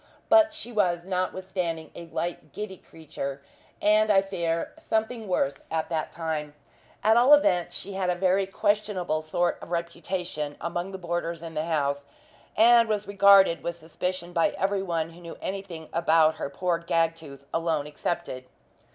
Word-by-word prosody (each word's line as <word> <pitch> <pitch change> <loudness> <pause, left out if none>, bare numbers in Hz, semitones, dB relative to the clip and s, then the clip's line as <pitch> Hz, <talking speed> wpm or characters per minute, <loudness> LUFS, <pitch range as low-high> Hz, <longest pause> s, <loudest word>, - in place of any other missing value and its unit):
But 325 -1 +6
she 310 -6 -6
was 180 -6 +1
notwithstanding 185 -3 -3
a 170 - -9
light, 165 -3 -4
giddy 210 -3 -6
creature 140 -4 -7 0.4
and, 215 +1 +4
I 195 -1 +5
fear, 170 -4 -2
something 220 0 -2
worse, 140 -7 0
at 160 -1 -2
that 160 -2 -2
time. 155 -3 -4 0.5
At 220 +2 +5
all 255 +5 +8
events, 175 - +1
she 200 - -6
had 190 -1 -1
a 180 - +2
very 190 +2 +2
questionable 195 -5 0
sort 175 +3 0
of - - -10
reputation 170 -3 -3
among 175 +2 -3
the 190 - -5
boarders 170 -2 -3
in 165 -1 -7
the 155 0 -2
house, 140 -3 -1 0.5
and 230 0 +6
was 210 -1 -1
regarded 200 -3 +6
with 170 0 -4
suspicion 175 +2 -4
by 175 +4 +2
everyone 190 -5 -1
who 170 +1 -14
knew 170 -1 -9
anything 190 -5 -6
about 160 -1 +4
her - - -3
poor 170 +4 -1
Gagtooth 165 -4 -1
alone 165 -3 0
excepted. 150 -3 -4
175 Hz, 155 wpm, -27 LUFS, 160-195 Hz, 0.5 s, all